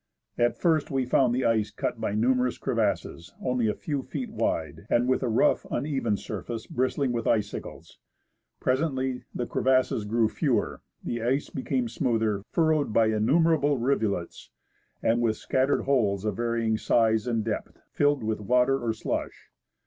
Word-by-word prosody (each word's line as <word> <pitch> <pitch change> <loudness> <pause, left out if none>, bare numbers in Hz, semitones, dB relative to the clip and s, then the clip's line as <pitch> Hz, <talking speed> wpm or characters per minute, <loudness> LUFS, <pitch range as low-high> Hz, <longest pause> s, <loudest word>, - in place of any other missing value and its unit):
At 120 0 +1
first 160 -4 +1
we 135 -3 0
found 125 0 +3
the 130 - 0
ice 110 -2 +2
cut - - -4
by 100 - -1
numerous 125 +2 +1
crevasses, 85 +3 -2
only 125 -3 0
a 105 - 0
few 145 -3 -3
feet 215 - -5
wide, 80 - -2
and 120 +1 +2
with 130 - +2
a 130 - 0
rough, 110 - +3
uneven 135 -8 -1
surface 110 +3 -6
bristling 130 +1 0
with 115 -1 -2
icicles. 105 -2 -3 0.6
Presently 130 -2 -1
the 120 - -2
crevasses 130 -5 +1
grew 110 +1 +2
fewer, - - -1 0.2
the 120 -1 -3
ice 130 +5 0
became 130 -2 -1
smoother, 110 -4 0
furrowed 155 -5 +2
by 110 0 +3
innumerable 145 +6 +3
rivulets, 110 -8 -1 0.5
and 115 +1 +2
with 115 -2 +1
scattered 130 +2 +1
holes 105 -8 +1
of 105 -2 -1
varying 115 -2 0
size 110 -1 +2
and 115 -3 0
depth, 110 -2 -4
filled 145 -3 +2
with 110 -1 -2
water 125 +5 +2
or 115 -1 0
slush. 110 - -5
120 Hz, 155 wpm, -27 LUFS, 110-135 Hz, 0.6 s, found